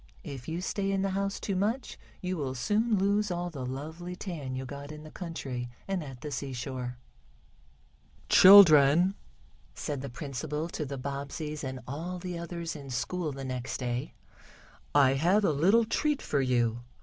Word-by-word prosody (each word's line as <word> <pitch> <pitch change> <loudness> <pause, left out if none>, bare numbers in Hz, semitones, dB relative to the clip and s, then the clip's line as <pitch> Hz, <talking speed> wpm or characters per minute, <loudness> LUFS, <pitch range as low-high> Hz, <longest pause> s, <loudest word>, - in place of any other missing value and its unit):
If 135 -5 -8
you 165 +2 -3
stay 195 +1 -1
in 195 -1 +1
the 195 - 0
house 195 +1 -1
too 200 - -2
much 220 +7 -1 0.3
you 185 0 -2
will 135 -5 -3
soon 215 - +1
lose 200 +2 +2
all 175 0 -2
the 140 -5 -6
lovely 160 +8 -5
tan 155 -9 -5
you 130 +1 -4
got 140 +2 -7
in 150 0 -9
the 155 - -11
country, 135 -9 -5 0.2
and 195 -4 -1
at 135 -4 -9
the 150 - -5
seashore." 130 -2 -4 1.3
"Children," 175 -2 +8 0.6
said 145 -3 -4
the 140 - -5
principal 150 +4 -4
to 155 -3 -4
the 140 0 -5
Bobbseys 140 +3 -5
and 130 -1 -5
all 165 +7 -4
the 180 0 -5
others 170 -1 -5
in 140 -2 -9
school 150 +7 -2
the 135 0 -6
next 130 -1 -3
day, 125 -1 -3 0.8
"I 135 -2 +6
have 180 +9 +3
a - - +4
little 195 +11 +4
treat 295 +6 0
for 140 - +1
you. 120 -3 +1
150 Hz, 170 wpm, -29 LUFS, 135-185 Hz, 1.3 s, Children